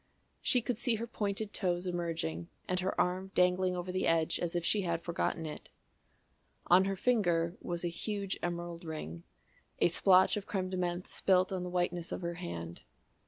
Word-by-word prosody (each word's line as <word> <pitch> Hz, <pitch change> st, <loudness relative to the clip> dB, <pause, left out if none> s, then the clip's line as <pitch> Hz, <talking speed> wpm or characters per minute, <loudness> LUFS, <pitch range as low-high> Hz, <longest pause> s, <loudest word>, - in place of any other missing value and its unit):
She 250 Hz, -2 st, +3 dB
could 240 Hz, -2 st, -2 dB
see 240 Hz, -1 st, +2 dB
her 225 Hz, +2 st, -3 dB
pointed 210 Hz, -2 st, -2 dB
toes 180 Hz, -2 st, 0 dB
emerging 165 Hz, -, -2 dB, 0.2 s
and 180 Hz, 0 st, 0 dB
her 185 Hz, +1 st, -1 dB
arm 185 Hz, +1 st, +1 dB
dangling 180 Hz, 0 st, +3 dB
over 180 Hz, +1 st, -3 dB
the 185 Hz, -, 0 dB
edge 165 Hz, -1 st, +2 dB
as 175 Hz, 0 st, -2 dB
if 175 Hz, -1 st, 0 dB
she 210 Hz, -, +3 dB
had 170 Hz, -2 st, -1 dB
forgotten 170 Hz, -1 st, -1 dB
it. 150 Hz, -, -7 dB, 1.0 s
On 185 Hz, +2 st, +6 dB
her 195 Hz, 0 st, 0 dB
finger 175 Hz, -7 st, +2 dB
was 175 Hz, 0 st, -3 dB
a -, -, +2 dB
huge 200 Hz, +3 st, -3 dB
emerald 175 Hz, -1 st, -4 dB
ring, 120 Hz, -, -6 dB, 0.6 s
a -, -, +4 dB
splotch 185 Hz, +3 st, +5 dB
of 200 Hz, -, -5 dB
crème 185 Hz, -2 st, -2 dB
de 185 Hz, -, -2 dB
menthe 175 Hz, 0 st, -1 dB
spilt 185 Hz, 0 st, +3 dB
on 185 Hz, -1 st, -2 dB
the 180 Hz, -, -4 dB
whiteness 175 Hz, -1 st, -1 dB
of -, -, -4 dB
her 170 Hz, 0 st, -2 dB
hand. 85 Hz, -, -6 dB
180 Hz, 185 wpm, -32 LUFS, 170-190 Hz, 1.0 s, On